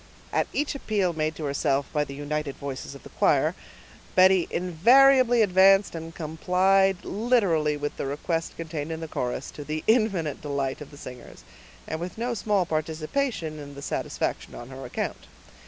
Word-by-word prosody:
At -, -, +1 dB
each 295 Hz, +1 st, -1 dB
appeal 205 Hz, -9 st, 0 dB
made 155 Hz, 0 st, -1 dB
to 160 Hz, -, -7 dB
herself, 140 Hz, -1 st, 0 dB
by 150 Hz, -1 st, +2 dB
the 140 Hz, -1 st, -8 dB
united 145 Hz, 0 st, -3 dB
voices 140 Hz, 0 st, -6 dB
of 140 Hz, -, -13 dB
the -, -, -11 dB
choir, -, -, +2 dB, 0.6 s
Betty 185 Hz, -1 st, +5 dB
invariably 240 Hz, +8 st, +5 dB
advanced 195 Hz, 0 st, +5 dB
and 165 Hz, 0 st, -7 dB
complied 185 Hz, +4 st, +2 dB
literally 190 Hz, -10 st, +1 dB
with 145 Hz, 0 st, -4 dB
the -, -, -3 dB
request 165 Hz, +4 st, -3 dB
contained 160 Hz, -2 st, -5 dB
in 160 Hz, -, -4 dB
the 165 Hz, -, -5 dB
chorus, 125 Hz, -2 st, -3 dB
to 145 Hz, -, -8 dB
the 155 Hz, +1 st, -4 dB
infinite 200 Hz, -, +1 dB
delight 140 Hz, -2 st, -2 dB
of 150 Hz, -, -8 dB
the 145 Hz, -, -14 dB
singers, 125 Hz, -3 st, -11 dB, 0.4 s
and 160 Hz, -, -3 dB
with 175 Hz, +3 st, -6 dB
no 240 Hz, +2 st, -1 dB
small 205 Hz, -4 st, +1 dB
participation 160 Hz, -, -2 dB
in 145 Hz, -1 st, -9 dB
the 140 Hz, -, -9 dB
satisfaction -, -, -3 dB
on 120 Hz, -, -9 dB
her 135 Hz, 0 st, -8 dB
account. -, -, -4 dB
160 Hz, 170 wpm, -26 LUFS, 145-195 Hz, 0.6 s, Betty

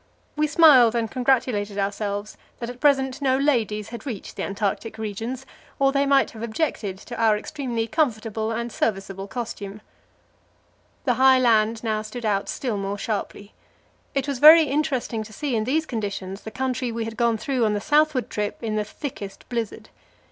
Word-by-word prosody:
We 305 Hz, 0 st, +2 dB
smiled 280 Hz, -8 st, +6 dB
and 230 Hz, -2 st, -1 dB
congratulated 245 Hz, -6 st, +1 dB
ourselves 205 Hz, +1 st, -2 dB, 0.2 s
that 235 Hz, 0 st, -5 dB
at 250 Hz, -, -13 dB
present 270 Hz, -2 st, +2 dB
no 260 Hz, -2 st, +2 dB
ladies 225 Hz, -7 st, 0 dB
had 235 Hz, -1 st, -8 dB
reached 235 Hz, -8 st, -6 dB
the -, -, -5 dB
Antarctic 210 Hz, +2 st, -2 dB
regions, 225 Hz, +5 st, -5 dB, 0.3 s
or 275 Hz, -1 st, +3 dB
they 280 Hz, 0 st, +1 dB
might 275 Hz, -1 st, +3 dB
have 220 Hz, -, -10 dB
objected 220 Hz, -, -2 dB
to 240 Hz, +5 st, -9 dB
our 220 Hz, -2 st, +4 dB
extremely 240 Hz, -2 st, -3 dB
comfortable 225 Hz, -6 st, -1 dB
and 235 Hz, +1 st, -3 dB
serviceable 195 Hz, -2 st, -2 dB
costume. 210 Hz, -3 st, -6 dB, 1.3 s
The 250 Hz, -, +3 dB
high 265 Hz, 0 st, +7 dB
land 225 Hz, -2 st, +3 dB
now 215 Hz, -2 st, 0 dB
stood 220 Hz, +2 st, -7 dB
out 200 Hz, -2 st, 0 dB
still 240 Hz, -6 st, -2 dB
more 195 Hz, +1 st, -3 dB
sharply. 205 Hz, -1 st, -4 dB, 0.6 s
It 275 Hz, 0 st, 0 dB
was 275 Hz, -3 st, -2 dB
very 315 Hz, +3 st, +10 dB
interesting 275 Hz, -6 st, -1 dB
to 215 Hz, 0 st, -9 dB
see 275 Hz, +3 st, -2 dB
in 215 Hz, -1 st, 0 dB
these 310 Hz, +6 st, +1 dB
conditions 200 Hz, -5 st, -4 dB
the -, -, -7 dB
country 255 Hz, +1 st, -2 dB
we 230 Hz, 0 st, -3 dB
had 225 Hz, 0 st, -6 dB
gone 235 Hz, -1 st, +2 dB
through 250 Hz, +2 st, -1 dB
on, 210 Hz, -1 st, +2 dB
the -, -, 0 dB
southward 295 Hz, +1 st, +2 dB
trip 210 Hz, -1 st, -2 dB
in 215 Hz, -1 st, -1 dB
the 210 Hz, -, +1 dB
thickest 210 Hz, -3 st, -8 dB
blizzard. 230 Hz, -3 st, -4 dB
230 Hz, 175 wpm, -24 LUFS, 210-265 Hz, 1.3 s, very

